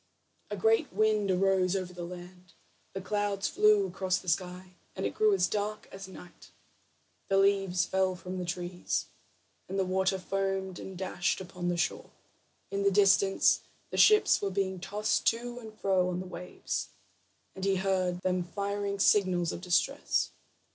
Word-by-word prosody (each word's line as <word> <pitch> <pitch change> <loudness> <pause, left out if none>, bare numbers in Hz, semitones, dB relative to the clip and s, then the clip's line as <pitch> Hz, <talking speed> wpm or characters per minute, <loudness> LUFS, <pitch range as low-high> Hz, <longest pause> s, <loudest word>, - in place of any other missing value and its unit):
A 205 - -4
great 220 +4 +2
wind 210 +1 +2
arose 190 0 +2
over 185 -2 -3
the 175 -1 -7
land, 180 0 -10 0.4
the 195 - -4
clouds 205 0 -1
flew 420 0 +4
across 190 - -1
the 185 - -11
sky, 180 +1 -2 0.2
and 190 - -3
it - - -2
grew 215 -1 +3
as 185 -3 +3
dark 210 +2 -3
as 195 0 -8
night; 180 -2 -13 0.8
the 195 - +2
leaves 195 -2 +3
fell 190 -1 +1
from 180 +1 -6
the 180 - -3
trees, 175 0 -3 0.6
and 195 - -3
the 190 - +1
water 190 +1 +1
foamed 195 -1 -2
and 190 -1 -8
dashed 185 -1 -1
upon 180 -1 -6
the 175 -1 0
shore. 170 - -2 0.6
In 200 - -1
the 200 - +4
distance 195 -1 +4 0.3
the - - -4
ships 425 0 +6
were 200 - 0
being 190 -1 -2
tossed 210 +3 -1
to 240 +1 0
and 220 -2 -10
fro 190 -4 +1
on 180 0 -2
the 185 - -5
waves, 180 0 -5 0.7
and 190 - -8
he 195 0 +2
heard 185 -2 0
them 185 -1 0
firing 200 +3 -3
signals 185 -4 +3
of - - -6
distress. 185 +11 +1
190 Hz, 165 wpm, -30 LUFS, 180-200 Hz, 0.8 s, ships